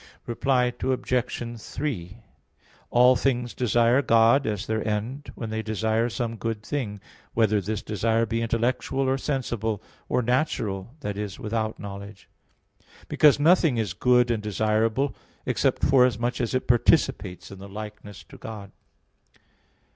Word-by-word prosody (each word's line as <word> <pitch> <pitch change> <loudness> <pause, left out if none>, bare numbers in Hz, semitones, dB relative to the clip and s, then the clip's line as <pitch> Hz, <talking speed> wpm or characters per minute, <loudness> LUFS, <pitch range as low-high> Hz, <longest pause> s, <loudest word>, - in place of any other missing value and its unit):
Reply 125 +1 +1
Obj. 125 -2 -2
3: 115 - -4 0.7
All 125 +1 +6
things 125 -3 0
desire 120 +2 +3
God 115 +2 +4
as 105 -2 -2
their 110 -1 -1
end, 115 +7 -3
when 115 -2 -5
they 110 0 -2
desire 110 +2 0
some 115 -1 -3
good 110 -1 -3
thing, 115 -7 -3 0.4
whether 110 -2 +3
this 105 +3 -3
desire 115 +2 +1
be 115 +1 -2
intellectual 125 +4 0
or 135 +1 +1
sensible, 120 -7 -2 0.3
or 125 - +1
natural, 120 -4 -1
i.e. 105 -1 -3
without 110 0 -2
knowledge; 100 0 -9 0.8
because 150 -2 +5
nothing 160 -4 +4
is 105 -6 -1
good 125 +3 +3
and 110 -2 -1
desirable 110 +5 0 0.3
except - - 0
forasmuch 125 -2 +3
as 120 +1 -1
it 130 - -1
participates 90 -6 +2
in 95 - -10
the 100 +1 -10
likeness 105 0 -9
to - - -15
God. 105 -3 -8
115 Hz, 130 wpm, -25 LUFS, 105-125 Hz, 0.8 s, All